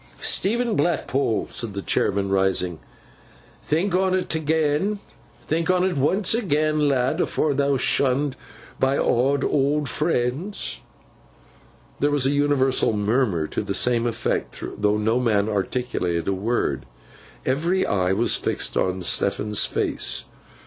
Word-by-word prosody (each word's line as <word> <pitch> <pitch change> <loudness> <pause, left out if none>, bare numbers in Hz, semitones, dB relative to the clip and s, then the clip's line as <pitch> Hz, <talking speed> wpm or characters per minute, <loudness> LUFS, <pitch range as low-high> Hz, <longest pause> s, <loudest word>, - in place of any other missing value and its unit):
'Stephen 235 +2 0
Blackpool,' 140 -8 0
said 115 -5 -5
the 100 - -3
chairman, 100 0 0
rising, 95 -3 +1 0.8
'think 170 +5 0
on 185 0 +2
't - - -3
agen. 160 +6 +1 0.4
Think 165 +2 -2
on 185 0 +3
't 190 - -1
once 185 +10 +2
agen, 155 -8 +1
lad, 135 +5 +1
afore 155 -2 0
thou'rt 140 -1 +1
shunned 135 +1 +1 0.4
by 135 +1 +2
aw 135 +4 +2
owd 145 +1 +1
friends.' 150 - -1 1.2
There 145 - +2
was 145 -3 +1
an 135 - +2
universal 140 -4 +2
murmur 105 -5 +1
to - - -2
the 100 -1 -3
same 120 -1 +2
effect, 115 - -3
though 105 0 +1
no 110 +3 +1
man 110 -4 +1
articulated 100 -5 -2
a 95 - +1
word. 105 - -1 0.6
Every 170 +8 +1
eye 95 -2 +1
was 115 +5 +2
fixed - - -1
on 95 0 0
Stephen's 100 +3 0
face. - - -2
130 Hz, 130 wpm, -23 LUFS, 105-155 Hz, 1.2 s, on